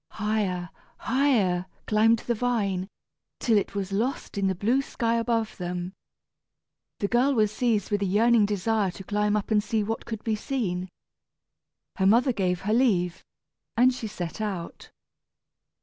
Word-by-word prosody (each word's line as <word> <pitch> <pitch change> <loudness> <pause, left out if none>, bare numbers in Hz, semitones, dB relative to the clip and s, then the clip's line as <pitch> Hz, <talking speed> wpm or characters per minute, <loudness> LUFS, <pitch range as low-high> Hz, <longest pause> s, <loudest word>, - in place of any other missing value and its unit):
Higher, 200 -4 -1 0.3
higher 225 -9 +1 0.2
climbed 225 +2 +4
the 240 - +1
vine, 210 -6 -1 0.5
till 230 - +2
it 200 -1 0
was 195 -1 -3
lost 230 +7 -2
in 200 -1 +1
the 190 - 0
blue 230 +9 +2
sky 230 -4 -1
above 230 -1 0
them. 180 0 -4 1.0
The 200 - -1
girl 255 +5 +2
was 215 -2 +3
seized 215 -3 0
with 205 -1 +1
a - - +1
yearning 215 +2 +4
desire 205 0 0
to 195 - -9
climb 210 +2 0
up 210 +1 -2
and 210 -1 +3
see 220 -1 0
what 225 +2 -4
could 220 -2 -5
be 220 -2 0
seen. 195 -7 -2 1.1
Her 190 - +3
mother 240 +5 +4
gave 180 -4 0
her 210 +3 0
leave, 190 -8 +2 0.5
and 255 +2 +5
she 235 -3 -5
set 195 -1 -5
out. 190 -6 -5
210 Hz, 155 wpm, -26 LUFS, 190-230 Hz, 1.1 s, and